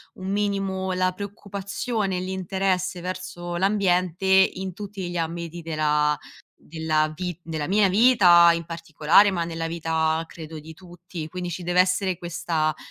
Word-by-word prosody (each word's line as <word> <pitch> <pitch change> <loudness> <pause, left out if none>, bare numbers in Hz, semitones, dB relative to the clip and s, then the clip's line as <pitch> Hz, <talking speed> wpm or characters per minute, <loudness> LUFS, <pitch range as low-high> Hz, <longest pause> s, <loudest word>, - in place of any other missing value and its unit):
un 190 0 -6
minimo 195 -2 -1
la 185 0 +1
preoccupazione 200 +1 -4
e - - -1
l'interesse 185 0 -1
verso 180 -1 -5
l'ambiente 185 -1 +1
in 190 0 +3
tutti 195 -2 -6
gli 175 - -4
ambiti 170 +1 -4
della 150 -2 +1 0.5
della 155 -1 0
vi 180 0 -5
della 160 -2 -4
mia 205 +1 +4
vita 185 -5 +6
in 170 0 -3
particolare, 165 +4 +3
ma 170 -3 -1
nella 165 -1 -4
vita 160 -1 0
credo 160 -1 -9
di 160 +2 -11
tutti. 175 -1 -9
Quindi, 180 0 -5
ci 175 +1 -5
deve 175 +1 +1
essere 185 0 +2
questa 165 -3 -1
180 Hz, 145 wpm, -24 LUFS, 165-190 Hz, 0.5 s, vita